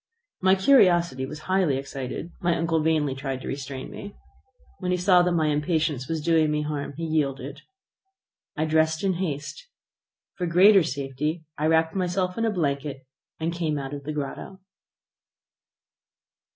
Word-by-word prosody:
My 190 +1 +5
curiosity 175 - +4
was 150 +2 -8
highly 185 -6 +1
excited, 135 +4 -6
my 175 -1 +1
uncle 165 -1 +1
vainly 155 -3 +1
tried 135 -1 -4
to - - -7
restrain 135 -1 -5
me. 205 0 -9 0.6
When 180 - -3
he 180 - +2
saw 180 0 +5
that 180 0 +1
my 165 -2 +1
impatience 150 -3 0
was 160 -2 -2
doing 160 -2 +3
me 150 0 0
harm, 150 -1 -4
he 165 - -5
yielded. 140 -3 -2 1.0
I 155 - +1
dressed 160 +1 +1
in 195 -1 +2
haste. 170 - -4 0.7
For 180 -2 -3
greater 190 +4 +6
safety 150 +2 -3
I 150 - 0
wrapped 160 0 +3
myself 180 0 -1
in 230 - 0
a - - +2
blanket, 140 -7 -2 0.3
and 165 +1 -1
came 160 -3 -1
out 135 0 -5
of 140 -1 -6
the 150 - -4
grotto. 150 +6 -5
160 Hz, 155 wpm, -25 LUFS, 140-175 Hz, 1.0 s, greater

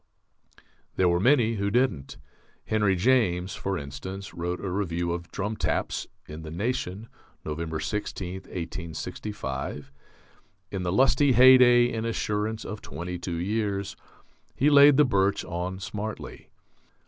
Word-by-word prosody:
There 95 - +3
were 85 0 +2
many 115 0 +3
who 100 0 0
didn't. 115 - 0 0.5
Henry 105 -3 +2
James, 95 -4 +2
for 95 -1 -3
instance, 95 +8 -7
wrote 90 +1 -3
a - - -5
review 85 -3 -1
of 85 0 -5
"Drum 105 +3 -3
Taps" - - -2 0.2
in 75 +1 -8
the 80 - -8
Nation, 105 - -3 0.4
November 80 +1 -3
16, 95 -2 -4
1865. 80 -4 -5 0.8
In 95 - -3
the 90 -1 -1
lusty 135 +5 +4
heyday 125 -1 +7
and 115 0 -2
assurance 110 -1 -2
of 105 +2 -6
twenty 90 +5 -6
two 85 -1 -4
years, 100 +1 -2 0.6
he 145 +3 +3
laid 145 -1 +8
the 150 - +6
birch 100 -5 +1
on 90 +2 -4
smartly. 105 +2 -6
100 Hz, 130 wpm, -26 LUFS, 85-115 Hz, 0.8 s, laid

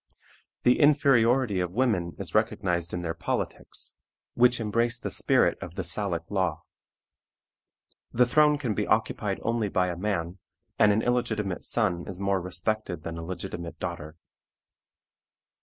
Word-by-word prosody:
The 125 - +4
inferiority 130 -7 +4
of 90 -1 -2
women 100 -8 0
is - - -5
recognized 85 -2 0
in 90 0 -3
their 80 -1 -2
politics, - - -4 0.4
which 125 0 +4
embrace 115 +2 +1
the - - -5
spirit - - +2
of 90 -1 -8
the 95 - -3
Salic 85 0 -2
law. 95 -6 -1 1.5
The 125 +1 +4
throne 150 +4 +4
can 125 -7 -2
be - - -2
occupied - - 0
only 115 -3 0
by 90 -1 +1
a 90 - -3
man, 90 -2 -2 0.4
and 105 - +6
an 110 +2 +1
illegitimate 110 -6 -1
son 90 -7 0
is 95 -1 -6
more 100 -1 0
respected 90 -1 -2
than 85 +1 -5
a - - -6
legitimate 85 -1 -6
daughter. 75 +1 -6
100 Hz, 140 wpm, -27 LUFS, 85-120 Hz, 1.5 s, and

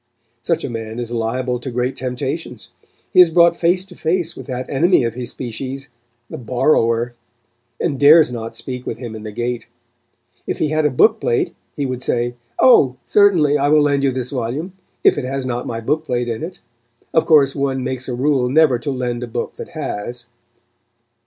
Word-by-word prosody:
Such 165 +6 -1
a - - -3
man 115 -1 -6
is 120 -1 -4
liable 125 +2 -1
to 130 - -6
great 125 +2 -2
temptations. 130 0 -4 0.4
He 185 - +8
is 175 - +6
brought 170 0 +5
face 180 +2 +1
to 190 -2 -15
face 170 +1 -1
with - - -10
that 125 -1 -4
enemy 165 +2 +3
of 115 -2 -1
his 120 0 -6
species, 130 +3 -6 0.4
the - - -8
borrower, 120 -1 +1 0.7
and 145 -6 -1
dares 150 0 +7
not 115 -1 -6
speak 125 +2 -6
with 110 - -3
him 120 -2 -7
in 110 - -8
the 105 0 -7
gate. 120 +1 -3 0.8
If - - -2
he 155 - 0
had 155 0 +2
a - - 0
book 135 - +3
plate 440 -7 0 0.2
he 145 - -2
would 130 -1 -4
say, 120 -1 0 0.2
"Oh! 135 - +5
certainly 170 -8 +4
I 140 - +2
will 150 0 +5
lend 140 -1 +2
you 140 - +2
this 125 -1 -3
volume, 140 +8 -3 0.3
if - - +4
it 135 - -4
has 135 0 -3
not 125 -1 -3
my 115 - -3
book 150 +7 -1
plate 125 -3 -1
in 115 -2 -3
it; 170 +3 -6 0.6
of 160 - +2
course, 145 -4 +5
one 135 -2 -1
makes 130 0 -4
a 125 - -2
rule 130 -1 +1
never 145 -3 +4
to 140 - -4
lend 125 -2 -2
a 125 - -4
book 115 - -4
that - - -8
has." 120 +4 -5
130 Hz, 200 wpm, -19 LUFS, 120-150 Hz, 0.8 s, He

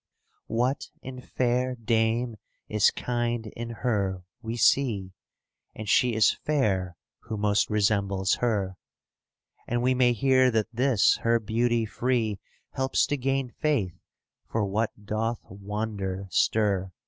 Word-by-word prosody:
"What 125 +4 0 0.2
in 130 -1 -7
fair 125 0 0
dame 115 0 0 0.3
is 105 -2 +4
kind 120 -1 -2
in 115 +2 -6
her 100 -6 -1 0.2
we 115 0 -4
see, 110 -5 +2 0.6
And 110 - -7
she 120 +2 +3
is 110 -2 +5
fair 95 -12 0 0.2
who 110 -2 -6
most 105 0 +2
resembles 100 -2 +1
her." 100 -6 0 0.8
*° - - -32
And 120 +1 0
we 130 +1 +3
may 125 -1 +3
hear 130 +2 +4
that 110 -1 -1
this 125 -3 +3
her 115 0 +2
beauty 115 +1 +1
free 115 -3 -1 0.3
Helps 130 0 +1
to 145 - -1
gain 135 -1 -1
faith 115 - 0 0.6
for 110 -2 0
what 105 +1 -2
doth 110 +2 -2
wonder 100 -1 -4
stir. 100 -4 +1
115 Hz, 130 wpm, -27 LUFS, 105-125 Hz, 0.8 s, is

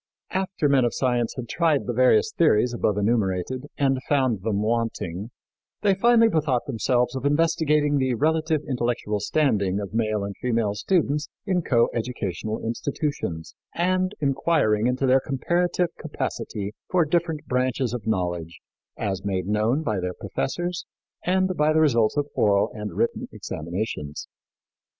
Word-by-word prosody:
After 190 -5 0
men 140 -2 +4
of 120 - 0
science 120 -3 0
had 125 -3 -5
tried 160 0 +1
the 120 - -2
various 125 - +4
theories 125 -7 +3
above 105 -3 0
enumerated 105 +4 0
and 135 -2 +1
found 130 -8 +2
them 105 0 -1
wanting, 110 -4 -2 0.5
they 200 -2 +4
finally 230 +3 +5
bethought 150 - +1
themselves 125 0 0
of 130 - -4
investigating 150 -1 +2
the 130 -2 +1
relative 155 +3 +1
intellectual 120 -5 -1
standing 100 -6 +1
of 100 0 -6
male 110 -2 0
and 100 0 -5
female 115 -4 0
students 150 - 0 0.2
in 185 -3 +1
coeducational 115 - -1
institutions, 115 - -3 0.2
and 185 +2 +1
inquiring 135 -6 +2
into 130 +2 0
their 130 +1 +5
comparative 175 +6 0
capacity 100 0 -4 0.2
for 180 -3 +3
different 160 -1 -1
branches 125 -1 0
of 115 -3 -5
knowledge, 90 -5 -2 0.4
as 95 -2 -2
made 95 -3 -1
known 110 +9 +1
by 105 -9 -1
their 90 0 -3
professors 175 - -3 0.4
and 185 0 +2
by 150 0 +3
the 155 - +3
results 120 -6 +3
of 145 - +2
oral 100 -1 +3
and 105 -6 -6
written 115 - 0
examinations. 80 -3 -5
125 Hz, 140 wpm, -24 LUFS, 105-155 Hz, 0.5 s, finally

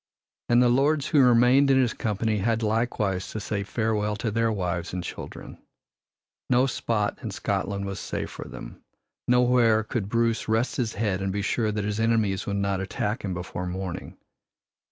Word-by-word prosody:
And 120 +1 +5
the - - +5
lords 140 +3 +2
who 150 -4 +5
remained 125 +3 +5
in 135 - +5
his 125 -3 +2
company 110 0 -1
had 115 +3 0
likewise 105 -4 0
to 110 - -5
say 105 -1 -3
farewell 105 0 -1
to 110 +1 -2
their 115 +1 +1
wives 90 -4 -2
and 90 -1 -3
children. - - -8 0.9
No 125 +1 +4
spot 115 -5 -1
in - - -4
Scotland 100 0 -2
was 100 0 -4
safe - - -4
for - - -8
them. - - -10 0.4
Nowhere 125 -3 +4
could 105 -2 -3
Bruce 115 0 +1
rest 110 +3 0
his 115 -3 -1
head 100 -3 -1
and 95 0 -1
be 100 +1 -2
sure 110 +1 0
that 105 -1 -2
his 105 +1 -2
enemies 110 -4 +1
would 100 - -1
not 100 -1 0
attack 105 +4 -3
him 95 -3 -3
before 90 0 -5
morning. 90 -1 -5
110 Hz, 175 wpm, -26 LUFS, 100-120 Hz, 0.9 s, And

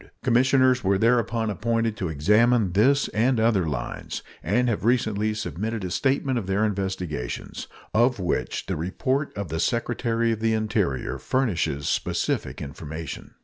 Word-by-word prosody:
Commissioners 130 0 +3
were 95 0 +3
thereupon 115 0 +2
appointed 115 +1 0
to 90 -5 -3
examine 105 +7 +3
this 130 +9 +3
and 120 +3 +1
other 110 -6 +2
lines, 70 -5 -4 0.2
and 120 +9 +1
have 115 -5 -1
recently 110 -3 +1
submitted 105 +2 -3
a 90 - -4
statement 135 +2 +1
of 100 - -7
their 100 +3 +2
investigations, 95 - -4 0.3
of 120 +3 +3
which 90 - -2
the - - -2
report 130 - -1
of 100 -5 -4
the 80 +2 -3
Secretary 115 +1 0
of 110 - -2
the 110 0 +1
Interior 105 - -1
furnishes 90 - -1
specific - - -1
information. 80 +3 -7
110 Hz, 145 wpm, -25 LUFS, 95-120 Hz, 0.3 s, Commissioners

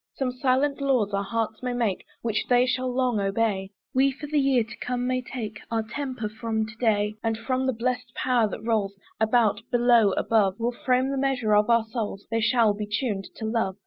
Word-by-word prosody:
Some 260 -2 -1
silent 265 +3 +1
laws 250 -7 +1
our 200 - +1
hearts 220 +1 -2
may 250 -1 -2
make, 230 -6 -1 0.2
Which 225 -2 -1
they 245 0 +5
shall 255 0 -1
long 250 -3 +1
obey; 195 -1 0 0.2
We 270 +1 +4
for 275 +3 -8
the 295 0 +1
year 270 -4 +3
to 220 - -10
come 250 0 -2
may 255 0 0
take 220 -4 -6
Our 225 -1 0
temper 255 0 -4
from 220 0 -2
to 215 +1 -11
day. 210 -2 +1
And 225 -1 0
from 255 +3 -1
the 260 - +1
blessed 245 +1 -3
power 245 -4 +2
that 220 - -7
rolls 210 -4 0 0.2
About, 220 -2 +3
below, 240 -4 +4
above; 205 -4 +2
We'll 235 +1 0
frame 255 +1 +2
the 275 - -2
measure 250 -6 +1
of 210 +2 +3
our 230 -1 +4
souls, 220 -3 -4
They 225 0 +1
shall 230 -2 +3
be 210 0 -5
tuned 210 -2 -2
to 220 - -5
love. 220 -4 0
230 Hz, 210 wpm, -26 LUFS, 215-255 Hz, 0.2 s, they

